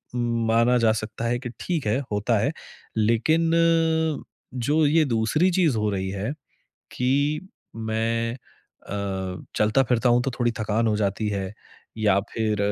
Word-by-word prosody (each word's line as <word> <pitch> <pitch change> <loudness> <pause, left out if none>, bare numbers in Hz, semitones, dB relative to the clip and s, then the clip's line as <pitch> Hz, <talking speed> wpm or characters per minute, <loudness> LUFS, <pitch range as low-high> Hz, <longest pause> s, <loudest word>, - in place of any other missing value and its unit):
उम, 120 -1 0
माना 115 +2 +4
जा 115 -2 +4
सकता 110 +1 -4
है 120 +1 0
कि 120 -1 -6
ठीक 165 -7 -2
है 110 +6 +2
होता 105 +2 +1
है 115 +7 +1 0.5
लेकिन 120 +10 +2 1.0
जो 145 +5 +1
ये 160 +2 +4
दूसरी 125 +9 +2
चीज़ 170 -9 +2
हो 105 0 +1
रही 95 -2 -2
है 100 +6 -3 0.6
कि 140 +4 +1 0.3
मैं 115 +2 -1 0.5
अ, 95 -2 -4
चलता-फ़िरता 120 +3 +2
हूँ 120 +1 +4
तो 135 - -1
थोड़ी 120 -1 +2
थकान 110 +2 +1
हो 105 - +2
जाती 105 +1 -1
है 100 -2 -2 0.5
या 105 -3 +3
फ़िर 110 -2 0
115 Hz, 145 wpm, -24 LUFS, 105-125 Hz, 1.0 s, माना